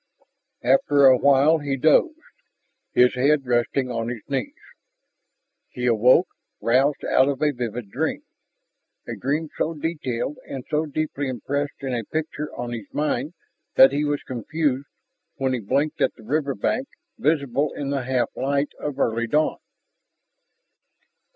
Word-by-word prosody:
After 135 +3 +4
a 130 -1 +8
while 140 +4 +4
he 140 -2 -2
dozed, 160 - +4 0.8
his 125 0 +4
head 140 +2 +2
resting 125 +1 0
on 115 -1 -2
his 120 -3 -6
knees. 215 - -3 1.1
He 125 - -5
awoke, 125 - +5 0.3
roused 135 +5 +2
out 130 - +4
of 140 -2 -1
a 150 - +3
vivid 120 -4 -5
dream, - - -2 0.8
a - - -4
dream 150 +4 -2
so 165 +1 -1
detailed 150 -4 -3
and 130 -2 -6
so 155 +1 +1
deeply 145 -1 -3
impressed 140 +3 -3
in 130 -2 -2
a 120 -2 -2
picture 150 +3 -4
on 120 0 -5
his 115 -4 -7
mind 150 +2 -2 0.4
that 135 - +8
he 145 +2 0
was 145 -1 -1
confused 140 +2 -2 0.5
when 130 -1 -1
he 125 - -1
blinked 140 +9 -1
at - - +2
the 110 - -16
riverbank 145 - -1 0.3
visible 145 - +1
in 140 -1 -4
the 140 -1 0
half 125 -2 0
light 140 +1 0
of 145 -2 -4
early 115 +1 0
dawn. 150 +6 +1
140 Hz, 145 wpm, -23 LUFS, 125-150 Hz, 1.1 s, a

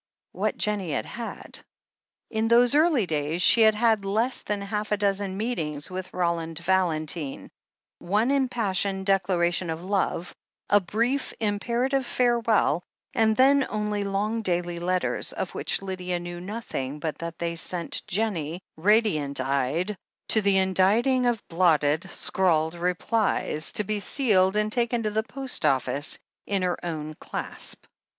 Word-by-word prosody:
What - - -2
Jennie 200 -7 -1
had - - -1
had! 230 +2 -7 0.7
In 220 0 0
those 240 +2 +5
early 300 - +4
days 155 0 -2
she 230 - +7
had 220 -1 +6
had 220 -2 +2
less 220 +6 0
than 210 -1 -3
half 210 +1 -3
a 210 - +2
dozen 200 -1 -1
meetings 160 -10 -3
with 185 0 -5
Roland 170 -2 -1
Valentine, 165 -4 -1 0.5
one 210 +8 +1
impassioned 205 -8 0
decla 195 -2 +2
ration 175 0 +1
of 160 +1 -4
love, 185 -2 -1 0.4
a 205 - +7
brief, 235 +8 -1
imperative 235 +6 0
farewell, 235 - +2 0.3
and 220 -4 +3
then 270 +1 +5
only 210 -1 -1
long 205 +3 -1
daily 175 -3 -1
letters, 180 +1 -1
of - - -4
which - - +1
Lydia 180 -2 -3
knew 175 0 -7
nothing 180 - -5
but 155 0 -4
that 170 0 -6
they 170 0 -2
sent 170 +1 -2
Jennie, 185 -5 -2
radiant 165 - +2
eyed, 140 +9 0 0.3
to 220 - +4
the 200 -1 +3
inditing 205 +7 +3
of 235 -4 -1
blotted, 165 0 +2
scrawled 165 -4 +1
replies, 180 -2 0
to 210 - +2
be 210 +1 -2
sealed 200 -5 +2
and 210 0 +1
taken 235 0 0
to 215 - -1
the 215 +1 +1
post 265 +3 -3
office 140 +2 +1 0.3
in 195 -2 0
her 180 -1 -1
own 155 -3 -4
clasp. - - -6
195 Hz, 145 wpm, -26 LUFS, 170-220 Hz, 0.7 s, she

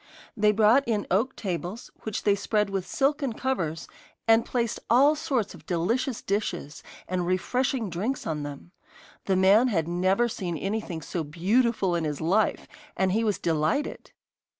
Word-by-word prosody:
They 210 -1 +4
brought 220 +6 +5
in 215 -3 0
oak 225 +8 +1
tables, 185 +3 -5
which 215 -2 -4
they 205 - +4
spread 210 0 0
with 195 -2 -2
silken 275 -2 0
covers, 185 -12 -2 0.4
and 225 0 +5
placed 235 -3 -1
all 275 +6 +6
sorts 270 -9 -1
of - - -15
delicious 220 +8 -1
dishes 185 -7 -3 0.3
and 180 -1 -1
refreshing 245 +6 0
drinks 205 +10 -3
on 155 -2 -2
them. 145 +3 -8 0.5
The 190 - +2
man 195 +6 +5
had 165 -9 0
never 185 +7 +2
seen 180 -7 -4
anything 195 -4 -3
so 160 +4 -3
beautiful 190 - +1
in 170 -1 0
his 150 -2 -2
life, 190 +7 +1 0.3
and 190 -1 +2
he 220 +4 +1
was 210 -3 +1
delighted. 165 - -1
200 Hz, 155 wpm, -26 LUFS, 175-235 Hz, 0.5 s, all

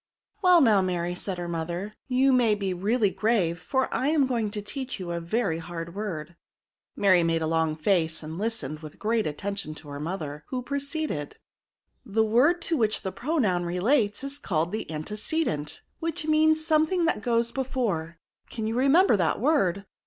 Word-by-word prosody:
" - - -44
"Well, 360 -2 +7
now 215 -7 +5
Mary," 175 -1 -1
said 185 +1 -4
her 175 0 -4
mother, 170 +5 -4
" - - -48
you 270 0 +5
may 235 -4 +4
be 195 -2 -2
really 205 +3 +1
grave; 190 -3 +1
for 265 +7 0
I 265 - 0
am 300 -2 +3
going 235 -5 -1
to 210 0 -4
teach 260 +4 -5
you 180 -2 -5
a 170 - -2
very 170 -1 -1
hard 170 0 -6
word. 175 -6 -5 0.6
Mary 190 -3 +4
made 165 -1 +1
a - - +1
long 160 -1 +1
face, 160 -1 0
and 160 +3 -6
listened 215 -9 -3
with 155 -2 -10
great 220 -1 0
attention 175 +1 -4
to 150 - -11
her 145 0 -6
mother, 150 -3 -5
who 255 -1 -3
pro 280 +3 -2
ceeded 280 - -3 0.2
— - - -67
" - - -48
The 220 - +5
word 285 +11 +3
to 330 - +1
which 220 -4 +1
the 190 - -2
pronoun 210 - 0
relates 205 +6 +1
is 275 +1 -3
called 165 -2 -1
the 215 - -4
antecedent^ 205 - -3 0.2
which 330 -2 -3
means 315 0 +3
some 310 -1 +3
thing 355 0 +1
that 325 -10 0
goes 235 0 +1
before; 225 -12 -2 0.3
can 220 -2 -4
you 225 +1 -1
remember 275 - +5
that 170 -4 +1
word 200 - +2
205 Hz, 195 wpm, -26 LUFS, 170-260 Hz, 0.6 s, Well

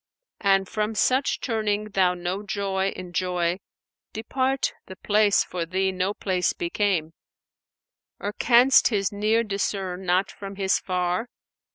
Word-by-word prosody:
An 195 -1 +3
from 215 +3 -2
such 260 +5 +2
turning 215 -3 -1
thou 185 -3 +2
no 180 +3 -3
joy 195 -1 -1
enjoy 180 0 -2 0.3
* - - -65
Depart! 260 +4 -1
the 190 - -9
place 205 +1 +3
for 175 -2 -4
thee 190 +3 0
no 185 +2 -1
place 185 -2 0
became. 170 -3 -1 1.1
Or 205 +1 -4
canst 245 +4 +5
His 200 -4 0
near 215 +3 +1
discern 195 -3 -3
not 185 +1 +1
from 195 0 -9
His 195 -1 +1
far? 180 +4 -1
195 Hz, 135 wpm, -25 LUFS, 185-210 Hz, 1.1 s, canst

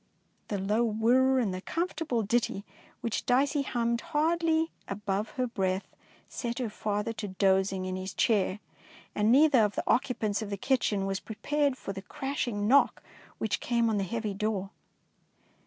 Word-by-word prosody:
The 205 - -2
low 210 +4 +1
whir 240 +4 +3
and 220 -7 +1
the 185 - -5
comfortable 325 - -2
ditty 210 -2 0
259 - - -42
DEEDS - - -29
OF - - -26 0.3
DABING 280 +4 +3
which - - -2
Dicey - - -7
hummed 235 -1 0
hardly 325 0 +1 0.2
above 200 +1 -2
her 255 - +1
breath 190 -5 -1 0.4
set 235 -1 -4
her 240 -4 -2
father 210 +1 -2
to 220 -2 -5
dozing 190 0 +1
in 185 0 -3
his 185 +1 -5
chair, 205 -3 +2 0.5
and 210 +2 +2
neither 285 0 +6
of 205 -1 0
the - - -1
occupants 230 -5 +1
of 215 - -5
the 200 - -3
kitchen 210 -4 +1
was 195 0 -1
prepared 285 +5 -1
for 195 - -6
the 195 - -6
crash 270 +8 -3
ing 205 -3 -1
knock 275 +4 +4 0.3
which 220 - -1
came 235 -2 +1
on 210 - +1
the 200 - 0
heavy 215 +1 -3
door. 200 -1 -2
220 Hz, 180 wpm, -29 LUFS, 200-255 Hz, 0.5 s, neither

